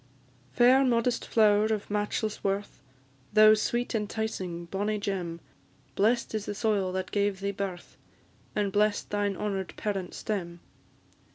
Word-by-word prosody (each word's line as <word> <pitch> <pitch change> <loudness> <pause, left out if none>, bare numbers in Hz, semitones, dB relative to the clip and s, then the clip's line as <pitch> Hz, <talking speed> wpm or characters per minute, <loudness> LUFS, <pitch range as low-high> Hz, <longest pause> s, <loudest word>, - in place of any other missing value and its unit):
"_ - - -29
Fair, 255 +3 +6
modest 240 -1 +1
flower, 210 -1 +4
of 215 -2 -2
matchless 210 +1 -2
worth! 200 +1 -2 0.5
Thou 215 0 +8
sweet, 240 +3 -1
enticing, 210 -5 -3
bonny 205 +4 -2
gem; 185 -5 -3 0.5
Blest 230 +4 +1
is 215 -1 -3
the 205 - -3
soil 205 -4 0
that 185 0 -3
gave 200 -1 0
thee 200 +1 -1
birth, 190 -3 -6 0.6
And 205 -2 0
bless'd 210 +1 +1
thine 205 -2 0
honour'd 195 -3 -3
parent 195 -4 -3
stem. 175 -5 -4
205 Hz, 135 wpm, -28 LUFS, 195-215 Hz, 0.6 s, Thou